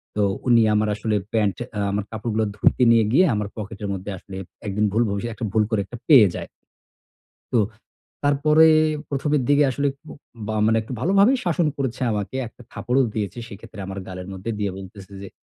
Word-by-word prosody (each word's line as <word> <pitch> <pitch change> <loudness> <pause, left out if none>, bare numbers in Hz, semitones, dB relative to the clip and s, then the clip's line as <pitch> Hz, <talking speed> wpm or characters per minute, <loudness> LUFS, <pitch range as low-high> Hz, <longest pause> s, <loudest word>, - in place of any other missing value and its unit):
তো 105 - +2 0.2
উনি 120 -2 +6
আমার 105 0 +2
আসলে 110 0 -1 0.2
প্যান্ট 105 -5 +1 0.2
আ - - -1
আমার 100 0 -1
কাপড়গুলো 110 0 -1
ধুইতে 125 +4 +2
নিয়ে 115 -1 +5
গিয়ে 185 +6 +6
আমার 105 -1 -2
পকেটের 105 -1 -6
মধ্যে 95 +2 -5
আসলে 95 +1 -10 0.3
একদিন 105 +2 0
ভুল 115 +2 +3
ভবিষ 100 +2 -3
একটা 115 - -5
ভুল 110 -1 +3
করে 110 - +1
একটা 120 - -9
পেয়ে 125 -9 +8
যায়। - - -6 1.0
তো - - +2 0.7
তারপরে 150 +3 +4 0.5
১ম 140 +1 -1
এর 135 - +1
দিকে 145 0 +5
আসলে 140 +3 0
কু 160 - -18 0.4
বা 110 - -2
মানে 110 0 +3
একটু 115 - -9
ভালোভাবেই 200 - +4
শাসন 175 -1 +1
করেছে 130 -3 -3
আমাকে 105 +5 -3
একটা 120 +2 -14
থাপ্পড়ো 125 +2 0
দিয়েছে 105 0 -3
সেক্ষেত্রে 100 +1 -11
আমার 95 0 -6
গালের 90 0 -7
মধ্যে 95 +4 -5
দিয়ে 100 -2 -1
বলতেছে 95 +1 -11
যে, 100 - -7
110 Hz, 185 wpm, -23 LUFS, 100-135 Hz, 1.0 s, পেয়ে